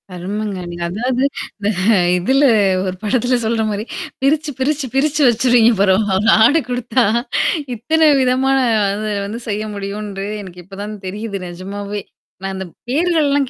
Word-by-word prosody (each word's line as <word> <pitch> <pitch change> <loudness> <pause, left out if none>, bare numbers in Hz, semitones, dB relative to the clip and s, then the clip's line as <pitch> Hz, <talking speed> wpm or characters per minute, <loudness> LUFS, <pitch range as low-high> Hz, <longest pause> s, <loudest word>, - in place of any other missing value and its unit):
அருமங்க 200 +2 -4
நீங்க. 175 0 -5
அதாவது 250 +6 -1 0.3
இந்த 205 0 -1 0.5
இதுல 265 +10 +2 0.4
ஒரு 185 0 -3
படத்தில 245 +3 +1
சொல்ற 225 0 0
மாரி 205 +1 -3 0.4
பிரிச்சு, 295 +2 +1
பிரிச்சு, 290 +1 0
பிரிச்சு 300 +2 +1
வச்சுருவீங்க 240 0 +4
பரவால்ல 200 +2 +3
ஆட 285 +8 +5
குடுத்தா, 245 0 0 0.7
இத்தன 315 +7 +3
விதமான 260 +1 +2 0.3
அத 200 +2 -2 0.2
வந்து 215 +4 -5
செய்ய 210 +1 -2
முடியும்ன்று 200 0 -5 0.2
எனக்கு 180 -2 -11
இப்ப 195 0 -12
தான் 210 +1 -6
தெரியுது 205 +1 -5
நெஜமாவே. 200 +3 -6 0.4
நான் 195 0 -4
அந்த 190 0 -5 0.2
பேர்கள்லாம் 290 -2 +2
215 Hz, 135 wpm, -18 LUFS, 200-265 Hz, 0.7 s, ஆட